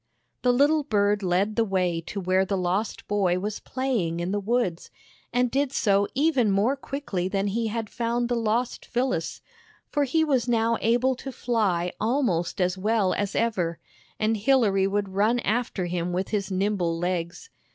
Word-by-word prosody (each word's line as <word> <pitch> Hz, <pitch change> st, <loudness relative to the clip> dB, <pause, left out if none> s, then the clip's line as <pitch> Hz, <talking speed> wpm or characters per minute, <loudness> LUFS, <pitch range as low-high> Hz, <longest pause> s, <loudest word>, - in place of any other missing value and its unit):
The 250 Hz, -, +3 dB
little 290 Hz, +5 st, +4 dB
bird 205 Hz, -6 st, +1 dB
led 190 Hz, +3 st, +1 dB
the 230 Hz, -, +3 dB
way 180 Hz, -5 st, 0 dB
to 200 Hz, -, -4 dB
where 185 Hz, 0 st, +2 dB
the 195 Hz, +1 st, -1 dB
lost 185 Hz, +4 st, -2 dB
boy 195 Hz, -4 st, +1 dB
was 210 Hz, +3 st, -3 dB
playing 235 Hz, -11 st, -2 dB
in 175 Hz, +2 st, -2 dB
the 205 Hz, -, 0 dB
woods, 205 Hz, -5 st, -1 dB, 0.4 s
and 245 Hz, 0 st, +1 dB
did 275 Hz, 0 st, +1 dB
so 200 Hz, -6 st, +2 dB
even 275 Hz, -5 st, +3 dB
more 205 Hz, +7 st, +2 dB
quickly 270 Hz, -10 st, -3 dB
than 195 Hz, +1 st, -1 dB
he 225 Hz, +3 st, -1 dB
had 225 Hz, 0 st, -3 dB
found 235 Hz, +2 st, -1 dB
the 245 Hz, -, -1 dB
lost 230 Hz, +2 st, -1 dB
Phyllis, 245 Hz, -9 st, -2 dB, 0.5 s
for 290 Hz, -1 st, +2 dB
he 320 Hz, +5 st, +2 dB
was. 265 Hz, -6 st, +1 dB
now 230 Hz, 0 st, +2 dB
able 245 Hz, +3 st, +2 dB
to 270 Hz, -, -6 dB
fly 200 Hz, -9 st, 0 dB
almost 215 Hz, -9 st, 0 dB
as 180 Hz, 0 st, 0 dB
well 210 Hz, -1 st, +2 dB
as 205 Hz, -1 st, -2 dB
ever, 180 Hz, -8 st, 0 dB, 0.4 s
and 220 Hz, +1 st, +1 dB
Hilary 205 Hz, -5 st, +3 dB
would 200 Hz, 0 st, -1 dB
run 210 Hz, +5 st, +2 dB
after 220 Hz, -4 st, -1 dB
him 175 Hz, 0 st, -2 dB
with 185 Hz, +2 st, -2 dB
his 205 Hz, -2 st, -1 dB
nimble 190 Hz, -3 st, 0 dB
legs. 175 Hz, -, -3 dB
210 Hz, 170 wpm, -26 LUFS, 185-245 Hz, 0.5 s, little